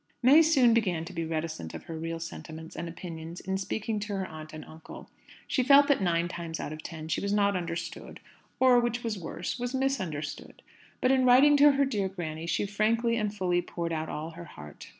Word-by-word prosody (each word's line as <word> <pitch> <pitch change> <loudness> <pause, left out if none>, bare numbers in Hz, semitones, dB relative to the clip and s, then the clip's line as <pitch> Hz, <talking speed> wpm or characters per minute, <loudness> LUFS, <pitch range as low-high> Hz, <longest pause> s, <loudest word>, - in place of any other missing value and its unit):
May 280 +6 +8
soon 275 -7 +5
began 185 -8 +1
to 185 - -9
be 165 -1 -3
reticent 155 - -4
of - - -8
her 165 - -7
real 165 +1 -4
sentiments 160 -1 -8
and 170 0 -5
opinions 165 0 -8
in 190 0 -3
speaking 215 +2 -2
to 205 0 -4
her 190 -1 -2
aunt 155 -2 -9
and 155 - -9
uncle. 160 0 -12 0.4
She 260 - +1
felt 280 +2 +6
that 280 - +3
nine 170 -2 +1
times 170 -2 -6
out 150 - -4
of 155 - -8
ten 160 -2 -7
she - - -1
was 200 - -2
not 200 -1 +2
understood; 170 -2 -5 0.4
or, 255 -2 +6
which 240 0 -1
was 220 -4 -2
worse, 175 +6 -5
was 245 +2 -3
misunderstood. 185 - -3 0.4
But 255 - +3
in 260 -1 +3
writing 260 +4 +7
to 290 0 +7
her 280 0 +3
dear 205 -8 -1
granny, 165 -3 -5
she 165 +4 0
frankly 225 +3 +1
and 210 -3 -1
fully 180 -4 0
poured 170 -1 -4
out 160 0 -3
all 155 +2 -5
her 170 +1 -10
heart. 75 - -12
185 Hz, 210 wpm, -28 LUFS, 165-235 Hz, 0.4 s, May